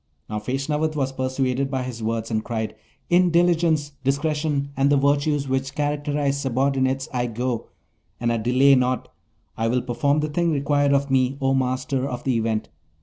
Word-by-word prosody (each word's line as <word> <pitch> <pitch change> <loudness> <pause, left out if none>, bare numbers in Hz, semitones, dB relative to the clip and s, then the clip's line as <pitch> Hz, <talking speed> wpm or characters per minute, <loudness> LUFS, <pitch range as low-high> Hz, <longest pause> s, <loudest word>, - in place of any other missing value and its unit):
Now, 105 0 -3
Feshnavat 150 +7 -1
was 135 -3 0
persuaded 130 0 -1
by 130 -2 -2
his 125 -2 -6
words, 115 +1 -2
and 110 -1 0
cried, 110 -2 -3 0.4
'In 180 +1 +5
diligence, 170 -3 +2
discretion, 145 +1 0
and 135 +1 +2
the 145 - +4
virtues 140 +1 +1
which 135 0 -2
characterize 145 -1 -1
subordinates, 135 0 0
I 125 -1 0
go, 120 0 -3 0.5
and 120 0 +1
I - - 0
delay 130 +5 +4
not! 125 -1 +1 0.5
I 115 - -1
will 125 +2 +1
perform 140 +4 +1
the 155 - -2
thing 170 +3 +1
required 145 -1 +2
of 140 0 +1
me, 130 0 +2
O 135 -1 +1
Master 130 +1 -1
of 125 -1 -5
the 130 -2 +1
Event.' 110 -1 -1
135 Hz, 170 wpm, -23 LUFS, 125-145 Hz, 0.5 s, In